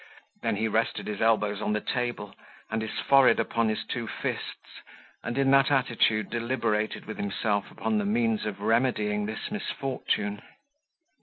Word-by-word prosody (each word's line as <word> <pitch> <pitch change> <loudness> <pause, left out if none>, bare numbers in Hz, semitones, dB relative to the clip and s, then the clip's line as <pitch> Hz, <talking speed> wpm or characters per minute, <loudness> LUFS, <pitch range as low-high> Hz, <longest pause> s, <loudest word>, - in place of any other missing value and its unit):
then - - 0
he 110 +2 0
rested 110 +1 0
his 105 0 -4
elbows 105 -2 +2
on 105 - 0
the 105 - +1
table, 120 -4 -3 0.4
and 110 0 0
his 110 - -4
forehead 135 -1 +6
upon 115 -1 +1
his 110 - -2
two 120 -2 -3
fists, - - -5 0.4
and 120 +2 -3
in 135 -1 +3
that 135 0 +5
attitude 115 -6 +2
deliberated 115 -2 -1
with 110 - -6
himself 100 0 -1
upon 215 -1 -1
the - - 0
means 225 +1 +1
of 100 -1 -5
remedying 105 -2 +1
this 110 - -5
misfortune. 130 - -2
110 Hz, 155 wpm, -28 LUFS, 105-130 Hz, 0.4 s, forehead